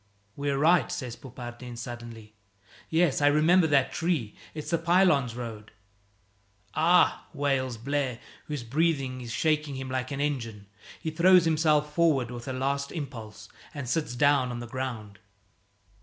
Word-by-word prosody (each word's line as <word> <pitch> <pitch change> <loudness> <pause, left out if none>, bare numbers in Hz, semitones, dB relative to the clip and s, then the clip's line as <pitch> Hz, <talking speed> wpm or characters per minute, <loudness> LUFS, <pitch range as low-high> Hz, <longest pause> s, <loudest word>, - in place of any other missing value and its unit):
"We're 140 -1 -1
right!" 155 -2 +4
says 125 -4 -4
Poupardin 120 -1 -9
suddenly. 120 -2 -8 0.6
"Yes, 160 -3 +2
I 145 - +5
remember 160 +4 +4
that 140 -3 +2
tree. 160 -11 -1 0.2
It's 155 +1 -5
the 170 - +2
Pylones 165 -8 +3
road!" 115 -3 -7 1.0
"Ah!" 170 +3 +3
wails 135 -4 0
Blaire, 130 0 -2 0.3
whose 150 -5 -4
breathing 135 -1 0
is 120 -1 -7
shaking 150 +1 0
him 130 0 -5
like 130 0 -2
an 140 -1 -4
engine. 115 -8 -3 0.3
He 160 - -3
throws 175 +2 +5
himself 155 -2 +2
forward 150 -8 +2
with 120 +1 -8
a - - -2
last 140 +2 -1
impulse 125 -9 -7 0.3
and 140 -3 -5
sits 130 -3 -1
down 140 -1 +3
on 120 -1 -4
the 120 - -6
ground. 120 -5 -5
135 Hz, 145 wpm, -27 LUFS, 120-155 Hz, 1.0 s, I